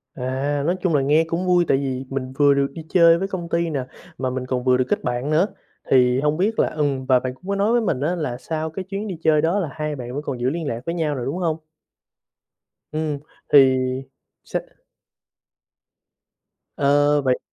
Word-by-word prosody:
À, 135 +3 -2
nói 175 +3 +2
chung 175 -5 +1
là 140 - +3
nghe 150 +4 +3
cũng 165 +3 -2
vui 175 -1 +4
tại 135 - +3
vì 135 -1 -3
mình 130 -1 -4
vừa 145 -1 +5
được 140 0 +2
đi 160 -2 -8
chơi 170 -2 +6
với 195 - -2
công 175 -4 -5
ty 170 0 0
nè, 140 -5 -2 0.3
mà 130 -1 -1
mình 130 0 -3
còn 125 -1 -2
vừa 130 0 +4
được 130 - +1
kết - - 0
bạn 125 +3 -2
nữa. 165 +6 +3 0.4
Thì 125 -1 +4
hông 150 +2 +1
biết 210 +5 0
là - - +4
ừm, 140 -4 -1
và 130 -1 +4
bạn 130 0 -4
cũng 180 +9 -17
có 200 - 0
nói 200 +3 +2
với 240 0 +3
mình 155 -11 -1
á 165 +5 0
là 140 -8 -3
sau 160 +4 -3
cái 175 +4 -5
chuyến 200 +3 -4
đi 190 - -4
chơi 155 -1 +4
đó 170 +5 +1
là 170 -6 -2
hai 150 0 -3
bạn 125 -2 -7
vẫn 145 - -3
còn 130 -5 -4
giữ 125 +2 +1
liên 160 0 -3
lạc 115 -2 -3
với 170 - -2
nhau 155 -4 -1
rồi, 125 -3 -4
đúng 145 +6 -2
hông? 165 -4 0 1.3
Ừm, 155 -2 -2 0.3
thì 135 -2 +7 0.7
sẽ - - -2 2.2
Ờ, 145 +1 +3
vậy 130 -2 +1
145 Hz, 220 wpm, -22 LUFS, 130-170 Hz, 2.2 s, thì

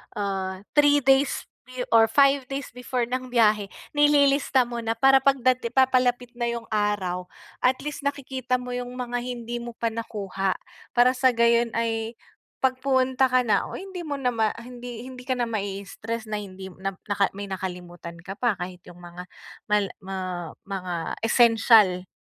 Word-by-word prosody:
ah, 190 -2 -3 0.2
3 290 0 +6
days 270 +1 +3 0.2
be 255 0 -5
or 225 -1 +6
5 275 +2 +4
days 275 0 -5
before 250 0 -2
ng 255 +2 -3
biyahe 215 -4 +3 0.2
nililista 285 -2 +4
mo 240 -1 -5
na 225 0 -2
para 270 +3 +6
'pag 275 0 +3
dati 255 -2 +2
papalapit 250 -1 +2
na 240 -1 -2
'yung 235 0 -3
araw 200 -4 -1 0.3
at 250 +1 +3
least 295 -1 -3
nakikita 265 -3 -2
mo 250 0 -4
'yung 245 0 -3
mga 245 -1 -3
hindi 240 -1 -5
mo 235 0 -8
pa 230 0 -1
nakuha. 200 -4 -3 0.4
Para 245 +1 +6
sa 255 -1 +2
gayon 235 0 +3
ay 225 0 -1 0.5
pag 260 -1 +2
pumunta 260 -1 +2
ka 255 0 +3
na 225 - +1
o - - -7
hindi 380 -1 -7
mo 290 - -2
na 260 -3 0 0.3
hindi 245 -1 -8
hindi 255 -1 -10
ka 260 - +1
na 245 - 0
mai-stress 215 +1 -4
na 210 - -1
hindi 190 -1 -9
na 195 0 -3
naka 200 -1 +1
may 200 0 -6
nakalimutan 180 -2 -6
ka 195 +2 -8
pa 240 -4 +2
kahit 180 0 -7
'yung 175 0 -13
mga 175 +1 -9 0.4
mal 210 -1 +3
ma 195 0 -6 0.5
mga 180 -4 -4
essential 225 -5 +5
235 Hz, 165 wpm, -25 LUFS, 200-255 Hz, 0.5 s, 3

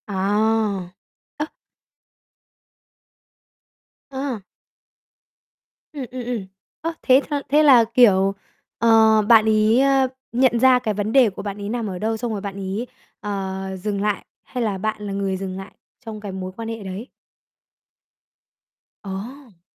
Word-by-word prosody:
À. 205 -1 0 0.5
Ơ. 300 - -1 2.6
Ờ. 265 -3 -4 1.5
Ừm, 280 -3 -5
ừm, 255 -1 -5
ừm. 235 -5 -3 0.4
Ơ, 330 +1 -2
thế 260 +1 +5
cho 290 -1 -1
thế 300 +3 +5
là, 260 -6 +7
kiểu, 195 -5 +5 0.5
ờ, 220 -1 +5
bạn 220 +1 +6
ấy, 215 +2 +4
ờ, 270 -1 +3 0.2
nhận 240 -1 +3
ra 255 0 +6
cái 220 -4 -2
vấn 205 +1 -2
đề 255 -3 +5
của 190 - -8
bạn 200 -1 -5
ấy 200 - -4
nằm 230 -1 -2
ở 185 -2 -5
đâu, 220 +2 -1
xong 235 +1 -3
rồi 205 -2 -3
bạn 200 -1 -6
ấy, 200 +5 -4 0.3
ờ, 190 -2 -4
dừng 205 0 -2
lại, 210 -1 -1 0.2
hay 250 -2 -4
là 205 -4 -1
bạn 215 +2 -3
là 200 - -4
người 195 -1 -1
dừng 190 -1 -5
lại 195 +1 -8 0.3
trong 220 -1 -6
cái 205 -2 -6
mối 185 -1 -5
quan 230 +1 -6
hệ 225 -2 -6
đấy? 195 +5 -6 2.0
Ồ! 205 +1 -8
215 Hz, 145 wpm, -22 LUFS, 195-245 Hz, 2.6 s, là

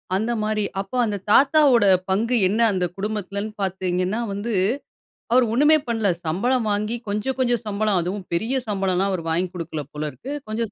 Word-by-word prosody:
அந்த 220 +4 0
மாரி, 215 0 0 0.2
அப்போ 195 +6 -5
அந்த 210 -2 -2
தாத்தாவோட 270 -2 +5 0.2
பங்கு 230 +6 +1
என்ன 210 +5 -1
அந்த 185 -2 0
குடும்பத்துலன்னு 205 0 -3
பாத்தீங்கன்னா 185 +1 -1
வந்து 205 +4 -3 0.8
அவரு 250 0 +5
ஒண்ணுமே 295 +5 +5
பண்ல 225 -4 +1 0.2
சம்பளம் 225 +9 0
வாங்கி 210 +3 -1
கொஞ்சம், 210 +6 -2
கொஞ்சம் 240 -3 +1
சம்பளம் 205 -2 +1
அதுவும் 185 +3 -4
பெரிய 225 +10 0
சம்பளம்லாம் 195 -1 0
அவரு 180 -3 -2
வாங்கி 175 +3 0
குடுக்கல 165 -3 -4
போல 150 0 -3
இருக்கு. 270 - -9 0.2
கொஞ்சம் 215 0 -3
210 Hz, 155 wpm, -23 LUFS, 190-235 Hz, 0.8 s, தாத்தாவோட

